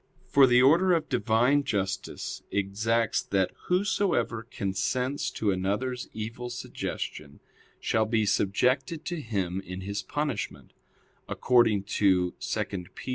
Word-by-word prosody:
For 140 -1 +6
the 125 0 +5
order 175 +7 +5
of 165 -2 0
Divine 125 +3 +3
justice 95 -5 -3
exacts 110 +3 0
that 95 -2 0 0.2
whosoever 180 - +1
consents 125 +8 -1
to 105 -2 0
another's 105 +7 -2
evil 115 +3 -5
suggestion, 120 - -5 0.4
shall 110 -1 +1
be 110 -1 +2
subjected 130 - +1
to 175 -3 -3
him 95 -6 -2
in 95 +1 -7
his 100 +2 -3
punishment; 145 -1 -4 0.6
according 115 -5 +3 0.2
to 90 -3 +3
(2 - - -1 0.3
Pet. - - -8
115 Hz, 120 wpm, -28 LUFS, 100-130 Hz, 0.6 s, For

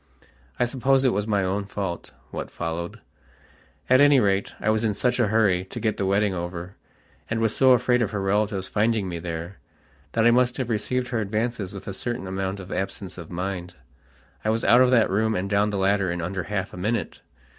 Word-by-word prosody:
I 125 - +4
suppose 135 +2 +2
it 130 - +4
was 105 +1 -1
my 100 -2 +1
own 100 +2 -1
fault, 95 -3 -4 0.2
what - - -5
followed. 85 +1 -5 0.9
At 130 +2 +5
any 145 -1 +6
rate, 100 -2 +1
I 110 - +1
was 110 +1 +1
in 105 -2 +1
such 125 +4 0
a 120 - +3
hurry 100 -4 +2
to 110 - -7
get 110 -2 -1
the 95 - -1
wedding 100 +1 +2
over, 85 +1 -5 0.5
and 115 - -1
was 115 -1 +1
so 130 -1 +6
afraid 125 0 +2
of 110 - +1
her 105 - -3
relatives 100 0 0
finding 110 -1 +1
me 85 -2 -4
there, 85 +2 -6 0.5
that 115 0 +2
I 120 - +7
must 125 0 +2
have 130 -3 -2
received 125 +3 -1
her 120 -3 -1
advances 105 -1 -2
with 100 -2 -9
a 100 - -3
certain 120 +2 -3
amount 95 +1 -3
of 95 -1 -9
absence 95 0 -4
of 85 - -9
mind. 90 0 -4 0.7
I 110 - 0
was 110 +1 0
out 120 +5 +6
of 130 - +5
that 115 -6 +4
room 110 +2 +1
and 95 0 -1
down 100 +1 +2
the 105 - -2
ladder 100 0 +2
in 85 0 -2
under 90 +2 -3
half 100 -2 -3
a - - -8
minute. 110 +4 -2
105 Hz, 215 wpm, -25 LUFS, 95-115 Hz, 0.9 s, I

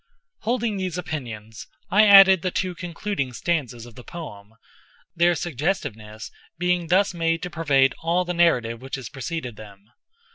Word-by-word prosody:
Holding 230 -2 -1
these 185 -3 -3
opinions, 115 -10 -7 0.2
I 210 +3 +6
added 195 -3 +8
the 185 - -1
two 185 0 -2
concluding 170 -5 -4
stanzas 125 -6 -2
of 120 - -13
the 125 - -12
poem—their 150 +6 -4
suggestiveness 120 - -4 0.3
being 180 0 0
thus 190 +3 +2
made 165 0 -1
to 180 - -5
pervade 140 -6 +2
all 175 +2 +1
the 180 - -2
narrative 125 -10 +2
which 135 +1 -5
has 130 -4 -7
preceded 135 -4 -5
them. 105 0 -14
165 Hz, 145 wpm, -23 LUFS, 120-180 Hz, 0.3 s, added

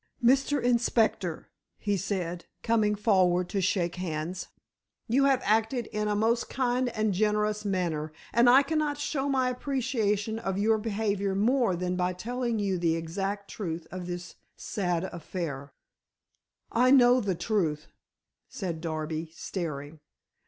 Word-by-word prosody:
"Mr. 275 +4 +4
Inspector," 225 -7 +1 0.3
he 205 -1 0
said, 180 -2 -3 0.2
coming 215 -2 +2
forward 185 -4 +3
to 200 - -1
shake 180 -2 0
hands, 175 0 -4 0.6
"you 265 +4 +3
have 270 -2 +3
acted 225 +3 +2
in 210 0 -1
a 210 - +1
most 225 +3 +1
kind 250 -1 0
and 215 -3 0
generous 210 +1 +1
manner 170 -6 -1 0.2
and 235 +1 +6
I 265 +3 +7
cannot 300 0 0
show 285 -1 -1
my 260 -2 +2
appreciation 230 -5 -1
of 195 -4 -2
your 220 +2 +3
behavior 200 -2 -1
more 230 -1 +2
than 180 +1 -2
by 180 0 0
telling 235 +4 -2
you 195 -3 0
the 165 -1 +2
exact 195 +5 -3
truth 170 -5 -4
of 180 -1 -6
this 175 0 -6 0.2
sad 180 -4 -1
affair." 160 -6 -5 1.0
"I 250 +2 +4
know 250 -1 +6
the 195 -4 -1
truth," 165 -5 -1 0.6
said 170 -6 -4
Darby 155 0 -3
staring. 155 -4 -5
205 Hz, 140 wpm, -28 LUFS, 175-235 Hz, 1.0 s, I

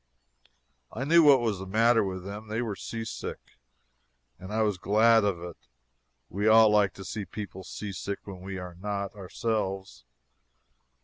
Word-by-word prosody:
I 120 - -4
knew 165 +4 +6
what 140 -5 +6
was 110 -5 -1
the 95 - -7
matter 115 +3 +4
with 95 -2 -4
them. 105 +2 -7
They 110 +3 -2
were 110 -4 -3
seasick. 115 +2 -5 1.0
And 95 +2 -9
I 110 +1 +1
was 105 -4 0
glad 110 +3 +4
of 100 -4 0
it. 85 -1 -8 0.7
We 100 +4 -2
all 110 0 +7
like 105 -2 +3
to 95 - -9
see 105 +2 -4
people 95 0 -8
seasick 100 0 -5
when 95 -3 -9
we 95 0 -6
are 90 -1 -7
not, 100 -1 -3
ourselves. 95 - -3
105 Hz, 160 wpm, -28 LUFS, 95-110 Hz, 1.0 s, all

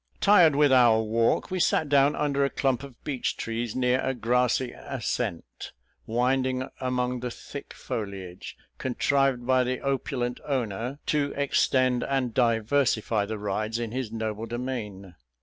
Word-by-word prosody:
Tired 180 -7 +6
with 145 -1 +4
our 120 -4 +5
walk, 115 - +1
we 185 - -1
sat 160 - +2
down 140 0 +4
under 140 -1 +1
a 140 - +2
clump 135 -3 0
of 140 -4 -12
beech 135 -4 -2
trees, 115 0 -3
near 125 0 +2
a 130 - -1
grassy 125 +1 +1
ascent, 85 - -4 0.3
winding 130 +2 0
among 125 -1 -1
the 125 0 -3
thick - - -9
foliage, 95 -4 -6 0.2
contrived 130 0 +1
by 130 0 +3
the 125 0 -2
opulent 130 -2 -2
owner 125 -1 -2
to 145 -2 0
extend 130 -3 +2
and 130 -4 -1
diversify 115 -2 +1
the 110 0 -4
rides 105 +2 -2
in 115 -2 -4
his 125 -3 -3
noble 110 0 -4
domain. 110 -6 -5
125 Hz, 145 wpm, -26 LUFS, 115-135 Hz, 0.3 s, Tired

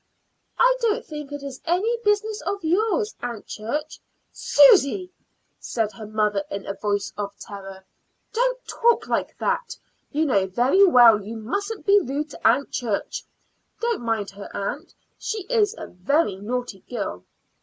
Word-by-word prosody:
"I - - +5
don't 465 0 0
think 300 -2 -7
it 290 -1 -6
is 275 -2 -7
any 375 +8 +1
business 420 +1 +1
of 400 -2 -3
yours, 425 +6 +1
Aunt 235 -3 -5
Church." 295 +9 -4 0.3
"Susy!" 370 - +5 0.5
said 220 -3 -2
her 215 -2 -9
mother 210 -2 0
in 200 0 -5
a 195 - -3
voice 205 -1 -2
of 200 0 -4
terror. 195 -2 -10 0.5
"Don't - - 0
talk 470 0 +2
like - - -1
that. 475 -2 -1 0.3
You 310 +2 +1
know 200 -9 +2
very 250 - +4
well 240 - +7
you 220 +3 -7
mustn't 400 - -4
be 405 0 +6
rude 300 -2 -3
to - - 0
Aunt 250 +5 +2
Church. 225 -5 -2 0.6
Don't 465 - -1
mind 225 -4 -1
her, 200 +1 -10
aunt; 280 - -4 0.2
she 435 -3 -3
is 425 -1 +1
a - - -6
very 205 - 0
naughty 235 0 -4
girl." 200 - -4
280 Hz, 155 wpm, -24 LUFS, -, 0.6 s, well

